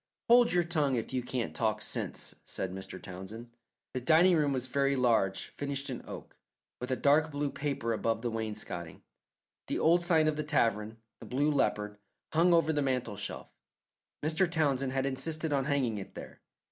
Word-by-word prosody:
"Hold 240 0 +7
your 175 -1 +3
tongue 150 -6 +1
if 115 +1 -3
you 130 - 0
can't 125 -1 -3
talk 110 -2 0
sense," - - -2
said 95 -1 -4
Mr. 95 0 -7
Townsend. 100 +6 -9 0.4
The 130 - -2
dining 165 +6 +5
room 150 -3 +2
was 130 -2 -1
very 140 +1 +1
large, 115 -7 +2
finished 140 -1 -3
in 125 - -5
oak, - - -9 0.4
with 125 - -5
a 130 - +1
dark 150 +4 +3
blue 145 -1 -2
paper 140 -5 -2
above 115 +1 -1
the 120 - -1
wainscotting. 105 -7 -5 0.6
The - - -1
old 170 +2 +4
sign 160 -3 +3
of 155 -1 0
the 150 - -1
tavern, 115 -7 0 0.2
the - - -10
Blue 145 +4 +1
Leopard, 105 -7 0 0.3
hung 170 +3 +4
over 165 -2 +4
the 145 - +1
mantel 130 -6 -1
shelf. 100 +1 -6 0.7
Mr. 160 +4 +2
Townsend 140 -5 +1
had 135 0 0
insisted 155 +3 -1
on 135 -2 +1
hanging 130 -7 0
it 95 - -10
there. - - -10
135 Hz, 180 wpm, -31 LUFS, 115-155 Hz, 0.7 s, Hold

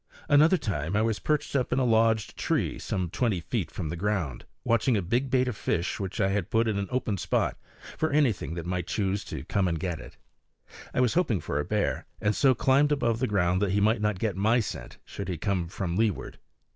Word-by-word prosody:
Another 155 +5 +5
time 85 - -2
I 105 - +3
was 110 -2 0
perched 150 -2 -1
up 130 -3 +1
in 125 - +1
a 130 - +2
lodged 110 -2 +2
tree, - - -1
some 90 -3 -2
twenty 115 -8 0
feet 80 - -3
from 80 - -5
the 85 - -3
ground, 90 -7 -2 0.2
watching 115 +1 +2
a - - 0
big 120 +9 0
bait 130 0 +2
of 125 - -2
fish 85 -2 -1
which 95 -2 -4
I 95 -2 +3
had 95 -3 -1
put 115 +1 +2
in 105 -2 0
an 100 - -2
open 120 -6 -1
spot - - 0 0.4
for 160 - +1
anything 130 - +1
that 85 -1 -5
might 90 -1 -2
choose 100 -1 -1
to - - -6
come 95 +4 0
and 85 -2 -1
get 85 -2 -3
it. - - -12 0.7
I - - +1
was 125 -3 +2
hoping 155 - +2
for 70 - -2
a 75 - -1
bear, 105 -1 -1
and 105 0 +1
so 135 -2 +4
climbed 135 +5 +3
above 120 -6 +1
the 130 - +1
ground 95 -2 +1
that 100 -2 +1
he 100 - +2
might 110 +2 +2
not 105 -2 +1
get 105 -1 -1
my 110 +5 +3
scent 110 - -5
should 100 -1 -6
he 90 - -2
come 90 +1 -1
from 85 0 -3
leeward. 105 -8 -1
105 Hz, 230 wpm, -27 LUFS, 90-120 Hz, 0.7 s, Another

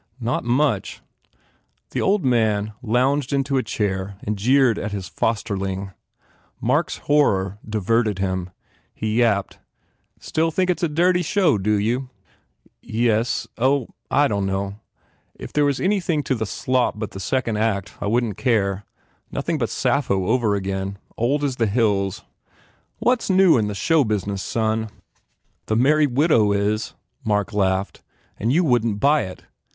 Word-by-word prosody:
"Not 120 0 -1
much!" 120 -4 0 0.9
The - - -1
old 195 -3 +2
man 110 -4 +1
lounged 130 +4 +1
into 140 0 0
a - - +3
chair 100 -4 -3
and 105 - -2
jeered 125 +2 +3
at 105 - -4
his 95 -3 -4
fosterling. 100 -2 -2 0.7
Mark - - +1
s - - -5
horror 100 -10 +2
diverted 110 0 +1
him. 95 -2 -2 0.5
He 110 0 -2
yapped, 105 -5 +1 0.6
"Still 160 +1 0
think 185 +3 +1
it 180 - -2
s - - -7
a 170 - +2
dirty 180 +4 +2
show, 175 - +2
do 105 +2 +1
you?" 120 +6 -1 0.7
"Yes.... 115 0 0
Oh, 130 0 +2 0.2
dunno! 100 -6 0 0.6
If - - -9
there 150 -1 +3
was 140 -2 0
any 200 +2 +2
thing 165 -5 -1
to 135 - 0
the 110 -4 -2
slop 130 0 0
but 110 -1 -4
that 95 - -7
second 115 +2 -1
act, 105 -3 -1
I - - -1
wouldn 115 +1 +1
t - - -15
care. 100 -5 +1 0.5
Nothing 155 +3 -2
but 115 - -1
Sappho 125 -8 0
over 110 -1 +2
again. 95 0 -3 0.2
Old 140 +6 0
as 135 -3 -1
the 115 - +2
hills." 100 -2 0 0.7
"What 245 -1 +2
s - - -5
new 190 -2 +5
in 110 -4 +1
the 105 - -4
show 160 +7 +3
business, 100 -3 -2
son?" 110 0 -1 0.8
"The 110 - 0
Merry 150 +5 +4
Widow 125 -6 +3
is," 105 +2 -1 0.3
Mark 105 +1 0
laughed, 95 -1 0 0.4
"and 115 +3 0
you 170 +6 +3
wouldn 120 -7 +2
t - - -6
buy 145 +2 +3
it. 90 - -11
115 Hz, 155 wpm, -22 LUFS, 100-140 Hz, 0.9 s, new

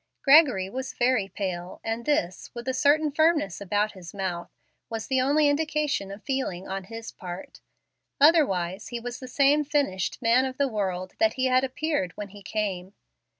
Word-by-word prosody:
Gregory 275 - +6
was 260 +6 -5
very 240 -5 +2
pale, 180 -3 -5
and 225 +1 -3
this, 185 -12 -1
with 235 +1 -7
a 260 - 0
certain 295 +3 +3
firmness 305 - +2
about 205 +2 0
his 180 -2 -11
mouth, 180 -3 -3 0.4
was 225 -1 -4
the 260 -1 +1
only 290 +3 +3
indication 295 -7 0
of 200 +2 -9
feeling 260 -10 -3
on 190 0 -4
his 225 +2 -8
part. 180 0 -9 0.6
Otherwise, 205 - +3
he 240 - -4
was 240 +1 -6
the 255 - -8
same 285 +3 +3
finished 275 -11 -1
man 245 +1 +4
of 260 -1 -4
the 280 - +2
world 185 -5 -3
that 330 0 +3
he 260 -1 0
had 255 0 +3
appeared 265 - -1
when 205 -1 -6
he 205 +1 -13
came. 195 -2 -3
235 Hz, 175 wpm, -26 LUFS, 190-280 Hz, 0.6 s, Gregory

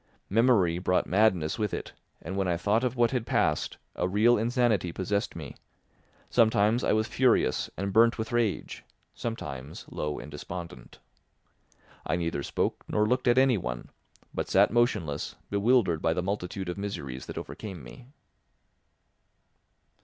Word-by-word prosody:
Memory 100 -7 +3
brought 90 0 +1
madness 95 -5 +2
with 105 -1 0
it, - - -7 0.3
and 95 +4 -5
when 95 -1 0
I 85 -1 +1
thought 105 +7 +1
of 125 -1 0
what 120 -1 +3
had 125 -3 0
passed, 115 -10 0 0.2
a - - 0
real 110 +6 +4
insanity 115 -5 +1
possessed 100 +4 -2
me; - - -8 0.7
sometimes 110 0 +3
I - - +2
was 110 +1 +2
furious 130 -2 +2
and 100 +1 -2
burnt 115 +2 +5
with 110 0 -4
rage, 120 -4 -1 0.3
sometimes 70 - -6
low 75 -1 -3
and 75 - -8
despondent. 85 +3 -8 1.1
I - - -1
neither 85 -4 -2
spoke - - -2
nor 105 - +1
looked 125 +3 0
at 120 +1 +4
anyone, 100 - +1 0.4
but - - -3
sat - - +4
motionless, 105 -11 0 0.2
bewildered 100 -5 +3
by 80 - +2
the 90 - -2
multitude 95 -1 -3
of 90 +2 -4
miseries 70 -11 -5
that - - -7
overcame 95 - -7
me. - - -12
100 Hz, 145 wpm, -28 LUFS, 85-115 Hz, 1.1 s, burnt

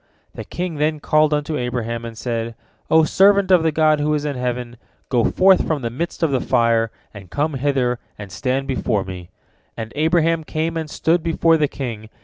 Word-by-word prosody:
The - - -7
king 175 -3 -4
then 150 +1 0
called 155 +1 +2
unto 150 +1 -1
Abraham, 120 -1 -3
and 115 -1 -8
said: 115 -1 -3 0.3
"O 160 0 +5
servant 195 +3 +4
of 180 -2 +6
the 160 0 +1
God 155 0 +3
who 150 +1 +1
is 150 0 -2
in 145 -2 -2
heaven, 125 -1 -3 0.3
go 120 -3 +2
forth 190 0 +4
from 150 -5 -1
the 115 - -2
midst 165 +7 -4
of 160 - +2
the 130 -2 +1
fire, 115 -1 +2 0.2
and 100 -4 -11
come 150 - -1
hither 130 -3 0 0.2
and 100 -2 -9
stand 130 +5 -1
before 120 -6 0
me," 90 -2 -8 0.5
and 110 0 -6
Abraham 160 +1 +2
came 160 +2 -2
and 160 -2 -3
stood 165 +3 +1
before 165 0 +2
the 155 -2 +2
king. 115 -6 -6
145 Hz, 195 wpm, -20 LUFS, 120-160 Hz, 0.5 s, of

